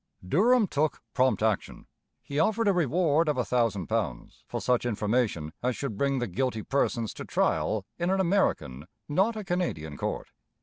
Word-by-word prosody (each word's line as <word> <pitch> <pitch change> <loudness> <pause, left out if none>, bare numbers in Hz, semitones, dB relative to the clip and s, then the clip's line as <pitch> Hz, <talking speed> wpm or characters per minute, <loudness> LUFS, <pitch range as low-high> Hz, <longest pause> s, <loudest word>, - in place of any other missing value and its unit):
Durham 225 - +4
took 155 -4 0
prompt 130 -4 +2
action. 110 -3 -1 0.4
He 145 +1 -3
offered 215 +6 +2
a 200 - +5
reward 165 -1 +2
of 145 - 0
a 125 - +1
thousand 115 -7 +1
pounds - - -3
for - - -3
such 125 -1 +1
information 105 -8 0
as 125 0 0
should 135 -7 -4
bring 140 +5 +1
the 120 - 0
guilty 110 +3 -2
persons 120 -5 0
to - - -7
trial 105 -3 0
in 175 +1 0
an 190 +1 +2
American, 170 - 0 0.2
not 190 +10 +2
a 215 - -4
Canadian, 165 - -2
court. - - -4
135 Hz, 170 wpm, -28 LUFS, 110-175 Hz, 0.4 s, a